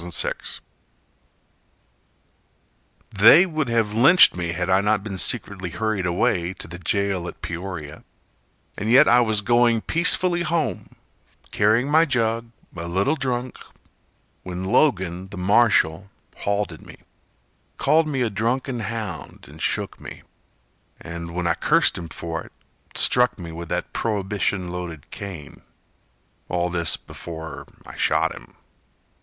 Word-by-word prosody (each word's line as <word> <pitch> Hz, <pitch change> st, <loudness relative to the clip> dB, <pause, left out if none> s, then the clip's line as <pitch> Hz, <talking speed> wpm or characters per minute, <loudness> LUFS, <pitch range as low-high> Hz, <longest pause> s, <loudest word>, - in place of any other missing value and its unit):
Jack 85 Hz, -1 st, -1 dB
McGuire -, -, -4 dB, 2.5 s
They 115 Hz, -, +7 dB
would 155 Hz, -7 st, -2 dB
have 115 Hz, -3 st, +1 dB
lynched 135 Hz, -, +6 dB
me 90 Hz, -1 st, -3 dB
Had 90 Hz, 0 st, -2 dB
I 95 Hz, +1 st, +3 dB
not 105 Hz, 0 st, +1 dB
been 100 Hz, -3 st, -5 dB
secretly 100 Hz, -6 st, 0 dB
hurried 100 Hz, 0 st, -2 dB
away 90 Hz, +1 st, 0 dB
To -, -, -9 dB
the 85 Hz, +1 st, -9 dB
jail 95 Hz, 0 st, -1 dB
at -, -, -10 dB
Peoria. 85 Hz, -4 st, -6 dB, 0.7 s
And 105 Hz, -, -3 dB
yet 135 Hz, +5 st, +7 dB
I 120 Hz, +1 st, +6 dB
was 110 Hz, -3 st, +1 dB
going 120 Hz, +1 st, +3 dB
peacefully 175 Hz, +3 st, +3 dB
home, 165 Hz, -1 st, -1 dB, 0.6 s
Carrying 110 Hz, +5 st, +2 dB
my 160 Hz, +3 st, +5 dB
jug, 115 Hz, -4 st, 0 dB, 0.3 s
a 85 Hz, -1 st, -6 dB
little 100 Hz, -, +1 dB
drunk, 130 Hz, -3 st, -3 dB, 0.8 s
When 90 Hz, 0 st, -6 dB
Logan, 95 Hz, -, +1 dB
the 100 Hz, 0 st, -10 dB
marshal, 95 Hz, -3 st, +2 dB, 0.3 s
halted 100 Hz, -5 st, -2 dB
me -, -, -12 dB, 0.8 s
Called 160 Hz, 0 st, +3 dB
me 135 Hz, -4 st, -1 dB
a 115 Hz, -, -1 dB
drunken 120 Hz, +4 st, -1 dB
hound 110 Hz, -5 st, -6 dB
and -, -, -13 dB
shook -, -, -2 dB
me -, -, -10 dB, 0.8 s
And, 85 Hz, 0 st, -7 dB
when 90 Hz, 0 st, -2 dB
I 85 Hz, -, +3 dB
cursed -, -, +2 dB
him 85 Hz, -1 st, -7 dB
for 80 Hz, 0 st, -5 dB
it, -, -, -14 dB, 0.4 s
struck 125 Hz, -1 st, +3 dB
me 85 Hz, -4 st, -8 dB
With 85 Hz, 0 st, -8 dB
that -, -, -3 dB
Prohibition 100 Hz, -3 st, -1 dB
loaded 85 Hz, -4 st, -7 dB
cane— 90 Hz, -8 st, -8 dB, 0.9 s
All 90 Hz, 0 st, -1 dB
this 85 Hz, -3 st, 0 dB
before 80 Hz, -2 st, -9 dB, 0.2 s
I -, -, -11 dB
shot -, -, +1 dB
him. -, -, -14 dB
100 Hz, 135 wpm, -23 LUFS, 90-120 Hz, 2.5 s, They